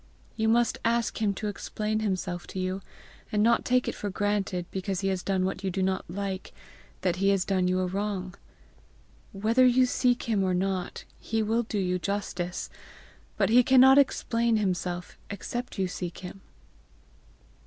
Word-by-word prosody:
You 220 0 +1
must 235 +1 +2
ask 230 -1 0
him 200 -2 +1
to 210 - -3
explain 210 +1 -2
himself 185 -4 -2
to 190 - -6
you, 185 +1 -2 0.5
and 210 0 +2
not 235 +1 +4
take 250 0 +2
it - - -1
for 205 - -4
granted, 195 -2 -1
because 190 0 -2
he 195 - 0
has 190 -1 -1
done 190 0 0
what 190 0 -3
you 190 - 0
do 190 +1 -1
not 190 -2 -1
like, 195 +1 -4 0.5
that 180 -1 0
he 195 +1 +2
has 195 -2 +2
done 185 -2 +1
you 185 0 +1
a - - +1
wrong. 190 -1 -3 1.0
Whether 220 +6 +2
you 255 0 +5
seek 245 0 +1
him 215 -4 +1
or 185 -1 +1
not, 185 0 -2 0.2
he 225 0 -1
will 225 +2 +1
do 220 -2 -4
you 180 -2 0
justice; 185 -2 -3 0.7
but - - +2
he 245 +2 +7
cannot 265 +2 +7
explain 235 -4 +2
himself 180 -3 -2
except 240 +5 -5
you 190 -1 +1
seek 180 -1 -5
him." 185 +1 -9
195 Hz, 175 wpm, -28 LUFS, 185-225 Hz, 1.0 s, he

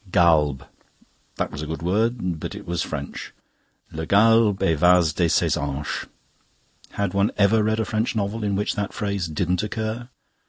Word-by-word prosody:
Galbe. 75 -7 +3 0.7
That - - -2
was 75 - -6
a 75 - -5
good 80 +1 -5
word; 100 -2 0
but - - -6
it - - -9
was 85 -1 -2
French. 70 -3 -6 0.6
Le 80 0 -5
galbe 110 0 +4
evase 85 0 +4
de 85 -1 +1
ses - - +2
hanches: 70 0 -3 0.9
had 100 -2 -2
one 100 +1 +2
ever 105 +2 +4
read 110 +1 0
a 110 - 0
French 110 +2 -1
novel 105 +1 -2
in 100 -1 0
which 105 +2 -1
that 105 0 -3
phrase 100 -4 -2
didn't 90 +3 -1
occur? 110 +3 -4
100 Hz, 165 wpm, -23 LUFS, 80-110 Hz, 0.9 s, galbe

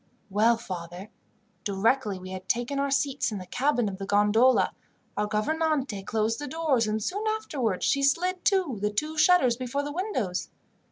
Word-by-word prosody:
"Well, 225 +4 +4
father, 180 -2 -7 0.5
directly 205 +1 +1
we 185 0 -9
had 185 0 -8
taken 245 +4 0
our 280 0 0
seats 275 -2 0
in 210 - -3
the 185 - -7
cabin 250 +3 0
of 195 -1 -5
the 195 - -5
gondola, 210 +6 +4 0.4
our 210 0 0
gouvernante 270 0 0
closed 220 +3 -1
the 290 - -5
doors, 285 -7 +1
and 215 0 -1
soon 410 - -2
afterwards 290 - -1
she 280 - +2
slid 355 +7 +1
to 365 - +1
the 210 - +1
two 305 +10 -2
shutters 305 -6 +4
before 255 +3 -2
the 290 - -4
windows. 275 - -2
240 Hz, 170 wpm, -27 LUFS, 205-290 Hz, 0.5 s, Well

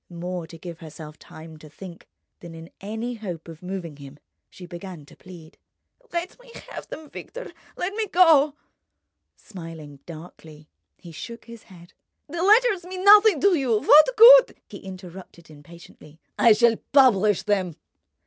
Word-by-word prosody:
More 175 -1 -7
to 165 - -13
give 170 0 -10
herself 155 -1 -12
time 160 0 -14
to 155 0 -15
think 175 +2 -13 0.3
than 170 -1 -12
in 165 +1 -13
any 220 +5 -6
hope 185 -8 -8
of 165 -1 -12
moving 180 -5 -7
him, 140 0 -13 0.3
she 180 - -13
began 175 -2 -11
to - - -19
plead: 175 -4 -16 0.5
"Let 345 +6 -5
me - - -18 0.2
have - - -9
them, 315 - -10
Victor—let 395 -2 -9
me 435 0 -3
go." 315 -6 +3 0.8
Smiling 165 -7 -12
darkly, 155 -2 -13 0.3
he 170 - -14
shook 230 +8 -10
his 235 -1 -14
head. 175 -2 -17 0.3
"The 335 +3 -6
letters 420 0 +3
mean 370 +1 -8
nothing 415 -4 +6
to 400 -1 +3
you. 255 -9 0
What 295 - +6
good—?" - - +8
He - - -11
interrupted 185 -3 -13
impatiently: 155 0 -17 0.2
"I 230 - +5
shall 230 0 +2
publish 215 -8 +3
them." 190 -6 -2
190 Hz, 150 wpm, -23 LUFS, -, 0.8 s, good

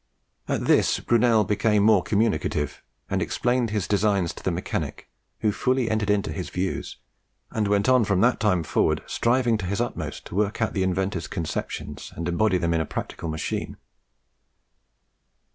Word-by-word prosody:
At - - -1
this - - +3
Brunel 115 -2 +3
became 105 +1 +2
more 105 -3 +5
communicative, 100 -9 0 0.3
and - - -1
explained 120 -1 0
his 105 -4 -1
designs 100 -3 +1
to - - -12
the - - +1
mechanic, - - -4 0.3
who 110 - +2
fully 125 +2 0
entered 110 -1 0
into 105 0 +1
his 90 -6 -5
views, 90 +3 -3 0.5
and 110 -2 0
went 100 +1 +2
on 130 -2 +5
from 100 -3 +1
that 125 +2 +3
time 95 -5 +2
forward - - +1
striving 120 -2 +1
to 95 - -3
his 100 +3 -2
utmost 120 0 -4
to - - -8
work 105 +1 0
out 110 - 0
the 95 - -1
inventor's 95 -1 -1
conceptions 80 -2 -5
and 85 +1 -4
embody 95 +2 +2
them 85 -1 0
in 80 - +1
a - - -1
practical 80 - -5
machine. 80 0 -3
105 Hz, 165 wpm, -25 LUFS, 90-110 Hz, 0.5 s, more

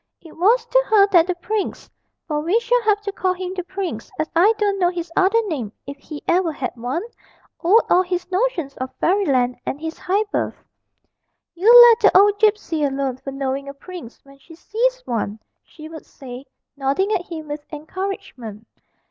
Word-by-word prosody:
It 325 - -15
was 450 +8 +3
to - - +2
her 415 -2 +6
that 345 -2 +5
the 360 - -1
prince 415 +4 -4 0.4
(for 300 -2 -1
we 345 +9 +1
shall 485 +1 +1
have 420 -2 +1
to 410 -1 -4
call 375 -1 -1
him 370 0 -5
'the 365 -1 -4
prince,' 360 - -5
as 310 - -1
I 370 +6 +5
don't 405 -2 0
know 350 -1 +3
his 345 -2 -6
other 390 +4 +3
name 270 - -4
if 280 - -7
he 295 +1 -10
ever 350 -1 +2
had 270 -4 -4
one) 250 - -3 0.6
owed 405 +7 +5
all 360 - +4
his 360 -1 -3
notions 365 - -1
of 260 0 -4
Fairyland 270 -10 +1
and 280 - -4
his 320 +1 -6
high 400 +4 0
birth. - - -1 1.0
'You 375 +7 +4 0.2
let 455 - +2
the - - +5
old 410 +1 +4
gipsy 415 -8 +1
alone 270 -2 -1
for 275 - -8
knowing 275 0 -3
a 280 - -9
prince 335 -5 -11
when 275 0 -19
she 325 +4 -15
sees - - -1
one,' 220 -2 -3 0.2
she 310 -2 -13
would 320 0 -11
say, 255 0 -10 0.3
nodding 280 +9 0
at 400 -4 +1
him 315 -4 -8
with 295 0 -5
encouragement. 300 - -6
345 Hz, 190 wpm, -21 LUFS, 280-395 Hz, 1.0 s, her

